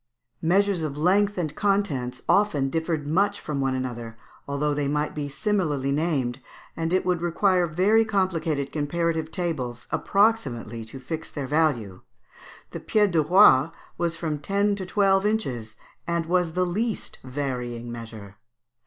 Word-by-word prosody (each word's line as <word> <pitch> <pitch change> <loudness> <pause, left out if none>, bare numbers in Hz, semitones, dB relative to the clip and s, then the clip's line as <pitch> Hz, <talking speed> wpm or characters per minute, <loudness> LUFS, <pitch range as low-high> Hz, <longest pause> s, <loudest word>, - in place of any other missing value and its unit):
Measures 190 +1 +2
of 145 -2 -3
length 200 +6 +2
and 155 -4 -2
contents 150 -12 0
often 155 -10 +2
differed 160 -1 -1
much 190 +7 +1
from 145 -3 -3
one 135 -1 0
another, 120 -3 -5 0.3
although 145 +1 0
they 145 -1 -1
might 150 +1 -1
be 145 -1 -4
similarly 150 -6 0
named, 140 -5 0 0.4
and 165 0 -2
it 185 - +1
would 180 -2 +1
require 180 +1 +2
very 195 +8 +3
complicated 170 -9 -1
comparative 160 +1 -1
tables 130 -10 -3
approximately 135 - +1
to 115 +4 -10
fix 155 +5 -5
their 145 -3 -5
value. 130 - 0 0.7
The - - -5
pied 210 -3 +2
de 165 -2 +3
roi 155 -3 +6 0.3
was 170 -1 -1
from 155 -3 -2
ten 200 +5 +1
to 190 -2 -5
twelve 195 0 +3
inches, 125 - -2 0.3
and 170 -1 0
was 175 -1 +1
the 180 +1 +1
least 215 +5 -3
varying 125 -3 -4
measure. 110 -4 -9
160 Hz, 145 wpm, -25 LUFS, 135-185 Hz, 0.7 s, roi